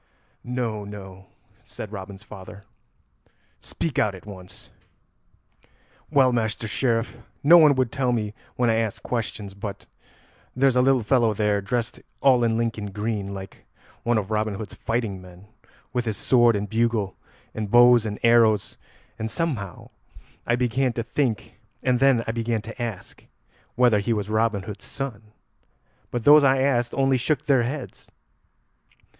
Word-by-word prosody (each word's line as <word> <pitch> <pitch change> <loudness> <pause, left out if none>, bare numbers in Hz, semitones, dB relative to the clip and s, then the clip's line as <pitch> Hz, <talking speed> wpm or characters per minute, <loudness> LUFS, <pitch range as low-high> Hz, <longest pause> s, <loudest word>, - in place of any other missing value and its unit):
"No, 120 -4 -3
no," 95 -2 -10 0.4
said 105 - -9
Robin's 100 0 -8
father; 100 -1 -11 1.0
"speak 160 -5 -3
out 105 -3 +1
at 95 - -13
once." 95 -3 -12 1.4
"Well, 135 -4 +4
Master 110 -1 -1
Sheriff, 115 +1 -1 0.2
no 170 +4 +8
one 150 -3 +6
would 130 -3 0
tell 130 -1 0
me 105 -3 -2 0.2
when 125 - +1
I 110 - +1
asked 110 -3 -2
questions, 110 -4 -4
but 100 0 -7 0.7
there's 130 0 +3
a 125 - +5
little 130 -2 +3
fellow 115 -2 +2
there, 105 -1 +1
dressed 115 +4 -3 0.2
all 130 -3 +4
in 115 -1 +1
Lincoln 115 -3 -2
green, 105 0 -3
like 95 -1 -10 0.3
one 120 -1 +1
of 105 0 -3
Robin 110 -1 0
Hood's 105 +1 -7
fighting 115 -5 -3
men, 90 +1 -14 0.5
with 125 -1 -1
his 110 -2 -2
sword 120 -3 +4
and 105 0 -2
bugle, 110 -3 0 0.4
and 110 -2 -4
bow 120 +2 +7
and 105 -2 -4
arrows, 115 -3 +3 0.4
and 110 - -3
somehow 120 - -4 0.6
I 120 - +3
began 125 +1 0
to 115 - -3
think, 120 -2 -2 0.2
and 125 -1 +2
then 135 -3 +4
I - - -1
began 115 -1 -2
to 115 +2 -8
ask, 115 -6 -6 0.5
whether 120 -4 +4
he 100 +3 0
was 105 -1 -3
Robin 110 -2 +1
Hood's 100 +1 -8
son; 110 -6 -6 0.8
but 120 -2 -3
those 150 +2 +8
I 135 -1 +4
asked 120 -3 +1
only 135 -1 +2
shook 145 +3 -1
their 135 -4 +4
heads. 130 +3 -5
115 Hz, 150 wpm, -24 LUFS, 105-125 Hz, 1.4 s, no